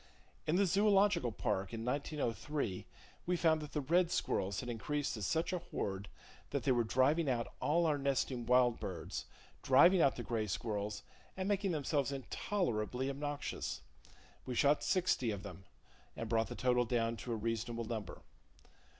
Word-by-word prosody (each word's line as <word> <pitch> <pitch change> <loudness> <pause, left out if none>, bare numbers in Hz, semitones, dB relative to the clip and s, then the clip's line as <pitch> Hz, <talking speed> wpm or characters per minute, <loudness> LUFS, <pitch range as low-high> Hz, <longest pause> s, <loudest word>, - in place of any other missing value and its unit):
In 155 - +2
the 200 +2 +4
Zoological 195 - +3
Park, 95 0 -2
in 115 0 -5
1903, 140 -4 -2 0.4
we 180 0 +2
found 160 -2 +3
that 150 - -8
the 150 - 0
red 170 +5 +3
squirrels 95 - -1
had 125 - -5
increased 145 +5 -2
to 110 - -5
such 160 - 0
a 180 - 0
horde 100 - -4 0.4
that - - -2
they 135 - +2
were 120 -2 +3
driving 135 +7 +2
out 120 -2 -1
all 170 +3 +2
our 150 -3 +2
nesting 135 -3 -1
wild 125 -1 +4
birds, 90 -4 -5 0.4
driving 170 +7 +6
out 140 - +4
the 120 - -5
gray 115 -3 -1
squirrels, 105 +1 -3 0.3
and 190 0 -2
making 200 -1 +1
themselves 145 -3 0
intolerably 130 - -2
obnoxious. 145 +1 -4 0.6
We 125 - -4
shot 145 +4 +3
sixty 180 - +1
of 100 -2 -3
them, 95 -2 -9 0.5
and 115 - -3
brought 115 0 +1
the 120 - -6
total 125 +2 +2
down 115 -1 0
to 120 - -6
a - - 0
reasonable 115 +1 -2
number. 110 -2 -5
130 Hz, 165 wpm, -35 LUFS, 115-155 Hz, 0.6 s, driving